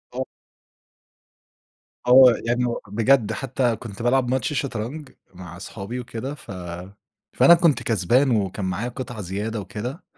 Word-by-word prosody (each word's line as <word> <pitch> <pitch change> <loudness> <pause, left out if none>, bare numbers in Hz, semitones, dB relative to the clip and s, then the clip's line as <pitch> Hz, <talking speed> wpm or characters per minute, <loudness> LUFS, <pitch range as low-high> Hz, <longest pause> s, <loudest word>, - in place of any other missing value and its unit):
آه. 130 - -1 1.8
آه، 125 0 +8
يعني 120 +1 +1
هو 120 -1 -2
بجد 115 +3 +2
حتّى 130 -2 -1
كنت 110 -1 -9
بالعب 125 +1 +2
ماتش 130 +2 0
شطرنج، 135 +2 -4 0.2
مع 90 -2 -10
صحابي 100 +5 -7
وكده 125 +3 -5
ف 135 - -12 0.8
فأنا 170 - +7
كنت 170 -4 +3
كسبان 120 +6 +2
وكان 100 -2 -1
معايا 95 +7 -2
قطع 120 -3 -7
زيادة 105 +4 -4
وكده، 105 - -6
120 Hz, 130 wpm, -23 LUFS, 105-130 Hz, 1.8 s, آه